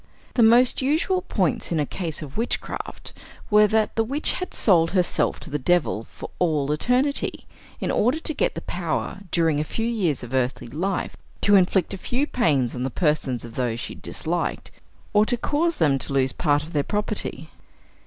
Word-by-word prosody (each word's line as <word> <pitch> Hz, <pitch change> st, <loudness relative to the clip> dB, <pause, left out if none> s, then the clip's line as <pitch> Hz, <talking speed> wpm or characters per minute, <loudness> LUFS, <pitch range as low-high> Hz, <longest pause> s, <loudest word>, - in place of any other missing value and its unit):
The 245 Hz, -, +2 dB
most 240 Hz, +4 st, +5 dB
usual 320 Hz, +7 st, +1 dB
points 185 Hz, -, -1 dB
in 165 Hz, -, +1 dB
a 150 Hz, -, +1 dB
case 160 Hz, -1 st, -4 dB
of 140 Hz, -2 st, -10 dB
witchcraft 230 Hz, +3 st, -4 dB, 0.4 s
were, 210 Hz, 0 st, +6 dB
that 215 Hz, +1 st, +1 dB
the 225 Hz, -, +2 dB
witch 275 Hz, +7 st, 0 dB
had 365 Hz, -, -4 dB
sold 165 Hz, -6 st, +3 dB
herself 180 Hz, -2 st, +1 dB
to 165 Hz, -, -6 dB
the 150 Hz, -, -1 dB
devil 150 Hz, -7 st, +1 dB
for -, -, -9 dB
all 150 Hz, -5 st, +1 dB
eternity, 250 Hz, -, 0 dB, 0.3 s
in -, -, -1 dB
order 250 Hz, +8 st, +2 dB
to 315 Hz, -, -2 dB
get -, -, 0 dB
the -, -, -4 dB
power -, -, -3 dB
during 160 Hz, -3 st, +2 dB
a -, -, +1 dB
few 225 Hz, +8 st, -3 dB
years 195 Hz, -, 0 dB
of 120 Hz, +1 st, -8 dB
earthly 130 Hz, -2 st, -1 dB
life, 180 Hz, +8 st, -2 dB, 0.3 s
to 205 Hz, -, +5 dB
inflict 190 Hz, -1 st, +3 dB
a 195 Hz, -, -6 dB
few 255 Hz, +8 st, -1 dB
pains 140 Hz, -, +1 dB
on 125 Hz, -, -5 dB
the 130 Hz, -, -1 dB
persons 150 Hz, -, 0 dB
of 115 Hz, -, -10 dB
those 120 Hz, -2 st, -1 dB
she -, -, -5 dB
disliked, -, -, -4 dB, 0.4 s
or 210 Hz, 0 st, +5 dB
to 245 Hz, +3 st, 0 dB
cause 320 Hz, +7 st, 0 dB
them 140 Hz, -, +2 dB
to 135 Hz, -, -2 dB
lose 130 Hz, -1 st, +2 dB
part 145 Hz, -3 st, +1 dB
of 160 Hz, -, -11 dB
their 145 Hz, -, +2 dB
property. 210 Hz, +7 st, -2 dB
175 Hz, 190 wpm, -24 LUFS, 145-230 Hz, 0.4 s, were